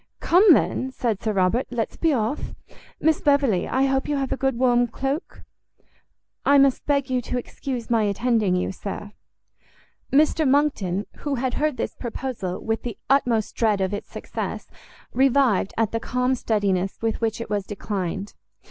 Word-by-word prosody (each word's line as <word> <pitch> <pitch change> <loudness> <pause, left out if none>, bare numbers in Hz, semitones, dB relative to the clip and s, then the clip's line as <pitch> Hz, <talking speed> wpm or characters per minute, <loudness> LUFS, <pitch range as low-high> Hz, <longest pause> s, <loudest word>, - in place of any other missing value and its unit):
"Come 365 +2 +6
then," 260 - +1
said 230 -6 -2
Sir 220 - 0
Robert, 195 +5 +1
"let's 235 -3 -3
be 330 - +1
off. 235 +1 -2 0.4
Miss 320 -1 +2
Beverley, 280 -10 +2
I 265 - +1
hope 270 0 +1
you 295 - 0
have 270 -1 -2
a - - +1
good 265 -2 -1
warm 245 -1 +3
cloak?" 270 - -4 1.0
"I 280 - +5
must 275 -2 +3
beg 280 -2 +1
you 250 -1 +1
to 250 - -3
excuse 245 -1 -5
my 230 -1 +4
attending 210 -2 +1
you, 180 - -1
sir." 200 +2 -6 1.0
Mr 305 +1 +3
Monckton, 215 -10 +1
who 290 -2 -2
had 255 0 -1
heard 300 -3 0
this - - -3
proposal 235 -6 -5
with 225 0 -1
the 235 -4 -5
utmost 240 -6 +2
dread 215 -3 +2
of 190 +1 -1
its 205 - -5
success, - - -5 0.5
revived 260 -6 +3
at 225 -2 +1
the 230 - -1
calm 250 +2 0
steadiness 200 -6 0
with 225 0 -1
which 225 -1 -1
it 230 - -6
was 205 -1 0
declined. 195 -1 -4
240 Hz, 165 wpm, -24 LUFS, 210-270 Hz, 1.0 s, Come